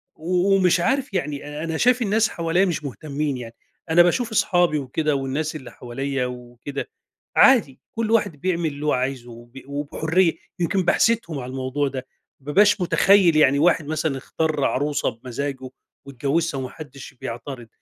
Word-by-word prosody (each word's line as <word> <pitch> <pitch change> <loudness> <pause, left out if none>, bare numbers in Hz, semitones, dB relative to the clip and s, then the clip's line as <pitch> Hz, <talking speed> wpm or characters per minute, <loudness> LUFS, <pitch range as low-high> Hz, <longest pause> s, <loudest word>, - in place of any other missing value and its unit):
و 180 +4 +1
ومش 180 -2 +3
عارِف 265 +5 0
يعني. 150 -3 -3
أنا 160 -1 -2
شايِف 250 0 +3
الناس 220 0 +2
حواليَّا 170 +3 +1
مش 170 -4 -2
مهتمِّين 140 0 -3
يعني، 115 -1 -9 0.3
أنا 165 +2 +6
باشوف 225 +6 0
أصحابي 175 -7 +2
وكده 145 +2 -1
والناس 140 +4 -2
اللي 135 -5 -8
حواليَّا 135 +2 -3
وكده، 125 - -7 0.5
عادي، 230 - +5 0.2
كل 225 -1 -1
واحد 210 -9 +1
بيعمل 170 -2 0
اللي 145 +1 -7
هو 150 - +2
عايزه، 125 -1 -2
وب 120 +3 -12
وبحُرية. 160 +5 0 0.3
يمكن 185 +2 +1
باحسدهم 215 -6 +1
على 125 0 -6
الموضوع 135 +2 -1
ده، 130 -1 -6 0.3
ما - - -25
بابقاش 200 +6 +4
متخيِّل 185 -1 +4
يعني، 140 -2 +4
واحد 165 -2 +3
مثلًا 155 -2 -1
اختار 150 +1 -1
عروسة 145 +2 0
بمَزَّاجه 130 +3 -5 0.4
واتجوَّزها 140 +3 -1
وما 130 - -4
حدِّش 145 -3 -11
بيعتَرِض، 120 +1 -6
150 Hz, 155 wpm, -23 LUFS, 135-175 Hz, 0.5 s, أنا